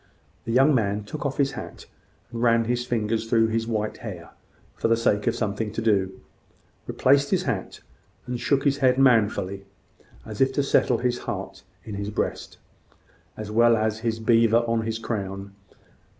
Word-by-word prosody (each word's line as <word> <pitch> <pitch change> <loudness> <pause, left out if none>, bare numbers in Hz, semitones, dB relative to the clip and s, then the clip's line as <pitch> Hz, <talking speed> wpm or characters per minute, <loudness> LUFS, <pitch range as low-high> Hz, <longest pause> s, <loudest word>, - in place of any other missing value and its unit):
The - - -3
young 135 +5 +5
man 105 -4 0
took 145 +7 -4
off 135 - -5
his 140 -1 +2
hat, - - -9 0.5
and 115 -1 -5
ran 115 -1 +3
his 120 +1 -1
fingers 115 -1 -1
through 115 -1 +3
his 115 0 -1
white 110 -2 -2
hair, 90 -7 -8 0.4
for - - -1
the 115 0 +3
sake 105 -3 +1
of - - +2
something 105 0 -2
to - - -3
do: 95 -4 +1 0.7
replaced 140 +2 +3
his 185 -2 +1
hat, 115 -9 -4 0.4
and 125 -1 -4
shook 135 +3 +1
his 140 -1 +2
head 130 -2 +3
manfully, 105 -7 +2 0.6
as 110 +1 -6
if 135 0 +4
to 145 - +1
settle 140 - +2
his 125 -1 -1
heart - - -5 0.2
in 110 - -8
his 100 0 -4
breast, 105 - -4 0.8
as 110 -1 -6
well 115 +1 +4
as 110 0 -1
his 115 0 -2
beaver 115 0 +4
on 115 -1 0
his 110 0 -2
crown. 100 -3 -5
115 Hz, 175 wpm, -24 LUFS, 105-125 Hz, 0.8 s, young